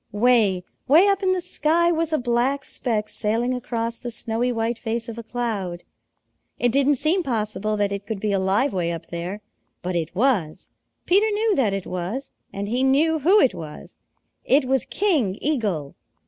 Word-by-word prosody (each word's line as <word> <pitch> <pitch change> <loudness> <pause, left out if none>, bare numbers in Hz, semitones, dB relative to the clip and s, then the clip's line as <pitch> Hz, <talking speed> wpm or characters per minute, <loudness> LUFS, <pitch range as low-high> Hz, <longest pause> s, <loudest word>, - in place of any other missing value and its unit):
Way, 210 -4 +3 0.2
way 320 +8 +6
up 395 0 +1
in 380 -1 +2
the 370 - -1
sky 340 0 +1
was 325 -1 0
a 310 - +2
black 250 +3 0
speck 215 -4 -2
sailing 230 +4 -1
across 235 -2 -3
the 245 - -5
snowy 235 +1 -1
white 230 0 -2
face 230 +1 -3
of 230 0 -6
a - - -7
cloud. 215 -7 -3 0.7
It 245 -1 +2
didn't 280 +3 +3
seem 320 +8 +2
possible 215 - -2
that 205 -1 +1
it 200 0 -5
could 220 -3 -3
be 210 +1 -1
alive 195 +7 +1
way 175 -2 0
up 165 0 -6
there. 175 +4 -5 0.4
But 180 0 -2
it 170 0 -2
was. 205 - 0 0.3
Peter 400 +4 +4
knew 425 0 +1
that 225 -7 +2
it 195 - -4
was, 185 +10 -4 0.2
and 200 +1 -4
he 245 +4 0
knew 300 +5 +3
who 365 +9 +5
it 265 - +4
was. 155 -3 -10 0.4
It 270 +1 +3
was 265 +1 +1
King 290 - 0
Eagle. 205 - -1
235 Hz, 180 wpm, -23 LUFS, 200-275 Hz, 0.7 s, way